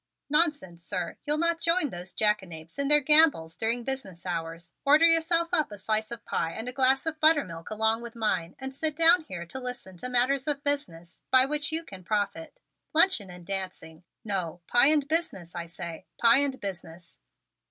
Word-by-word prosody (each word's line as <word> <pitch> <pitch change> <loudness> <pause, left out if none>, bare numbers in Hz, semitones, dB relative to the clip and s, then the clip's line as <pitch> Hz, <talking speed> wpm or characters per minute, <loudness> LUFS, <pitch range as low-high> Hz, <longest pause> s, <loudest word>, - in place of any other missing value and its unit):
"Nonsense, 295 - 0
sir! 175 0 -4
You'll 300 +1 +3
not 335 +1 +2
join 330 -3 +2
those 180 +1 -7
jackanapes 190 - -2
in 280 - +1
their 295 +1 +7
gambols 290 - +4
during 230 +4 -2
business 235 -10 -5
hours. 165 -1 -5
Order 300 +4 +5
yourself 335 0 +3
up 310 -9 +1
a 205 - -8
slice 215 +2 -2
of 235 -2 -8
pie 165 - -2
and 225 +2 -6
a 250 - -4
glass 265 +2 +2
of 320 0 -3
buttermilk 280 - +2
along 220 +1 0
with 235 0 -10
mine 185 -7 -2
and 265 0 -6
sit 310 +2 +2
down 335 +2 +5
here 175 - -7
to 215 +10 -6
listen 245 -7 -7
to 250 - -5
matters 255 +3 +1
of 290 -1 -1
business 180 - -3
by 260 0 +5
which 295 +1 -2
you 325 +1 -1
can 190 - -12
profit. 205 -5 -3 0.4
Luncheon 325 - +4
and 180 -1 -12
dancing! 180 -4 -6 0.2
No, 180 -5 -4
pie 240 +7 +4
and 295 -2 +3
business, 310 - -1
I 170 -1 -6
say, 170 -1 -8
pie 235 +2 +5
and 275 -2 -1
business!" 175 - -8
235 Hz, 185 wpm, -27 LUFS, 180-295 Hz, 0.4 s, their